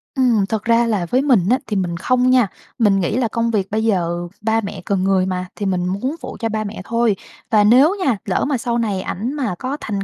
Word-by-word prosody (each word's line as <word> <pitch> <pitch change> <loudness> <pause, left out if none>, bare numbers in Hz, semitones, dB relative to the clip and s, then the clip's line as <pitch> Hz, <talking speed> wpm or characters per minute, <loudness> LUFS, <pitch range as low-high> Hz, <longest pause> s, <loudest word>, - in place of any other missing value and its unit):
Ừm, 240 -6 +3
thật 220 -2 -2
ra 230 0 +3
là 210 -6 0
với 255 +9 +1
mình 240 -11 +3
á, 255 - +4
thì 215 - -2
mình 175 -3 -1
không 255 +7 +2
nha. 255 -4 +4 0.3
Mình 205 -4 +4
nghĩ 185 +6 -1
là 250 -3 +1
công 230 +1 -1
việc 200 -3 -1
bây 220 +1 0
giờ 175 -5 0
ba 225 +1 +1
mẹ 200 -2 -6
cần 195 -2 0
người 190 -1 +2
mà, 185 -1 -2
thì 205 - -4
mình 185 -2 0
muốn 255 - -2
phụ - - -7
cho 225 -2 -1
ba 215 0 -2
mẹ 205 -2 -6
thôi, 230 -3 +1 0.4
và 215 -2 +5
nếu 260 - +5
nha, 245 -6 +2
lỡ 190 - 0
mà 280 -2 0
sau 235 0 -2
này 205 -5 -1
ảnh 230 +9 -4
mà 250 -11 -2
có 270 +3 -3
thành 200 -2 -3
220 Hz, 250 wpm, -19 LUFS, 195-240 Hz, 0.4 s, và